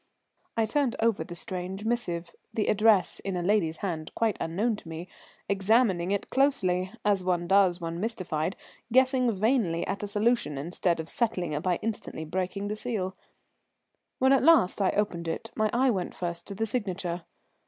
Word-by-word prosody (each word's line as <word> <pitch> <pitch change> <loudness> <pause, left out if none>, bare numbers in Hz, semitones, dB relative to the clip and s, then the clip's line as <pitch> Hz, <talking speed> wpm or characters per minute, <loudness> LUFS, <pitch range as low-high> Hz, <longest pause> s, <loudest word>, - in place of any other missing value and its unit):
I 225 - +3
turned 260 +2 +1
over 225 -2 +2
the 175 - -9
strange 185 +3 -5
missive, 175 -8 -2 0.2
the 215 - 0
address 215 -2 +3
in 195 -2 -4
a 175 - -2
lady's 175 -5 +2
hand 160 -4 -3
quite 225 -4 +1
unknown 210 +8 0
to 165 - -11
me, 165 +2 -6 0.4
examining 195 -2 +2
it 200 0 -2
closely, 190 -10 +2
as 200 -3 +2
one 175 -1 0
does 190 -2 +4
when 165 0 -4
mystified, 185 -5 -2 0.4
guessing 255 0 +4
vainly 205 -5 +1
at 200 - -3
a 205 - -3
solution 210 - +1
instead 170 +3 -1
of 160 - -4
settling 180 -9 -1
it 150 - -1
by 180 0 +1
instantly 210 -7 -4
breaking 185 +4 -2
the 210 - -2
seal. 210 -5 -3 1.0
When 265 +1 +4
at 270 - +4
last 315 - +5
I 190 - +4
opened 175 -5 -1
it 225 +7 -4
my 215 -1 +2
eye 255 +2 +3
went 185 -5 -3
first 170 -1 -4
to 200 - -5
the 225 +3 0
signature. 190 -6 -2
195 Hz, 175 wpm, -28 LUFS, 175-225 Hz, 1.0 s, last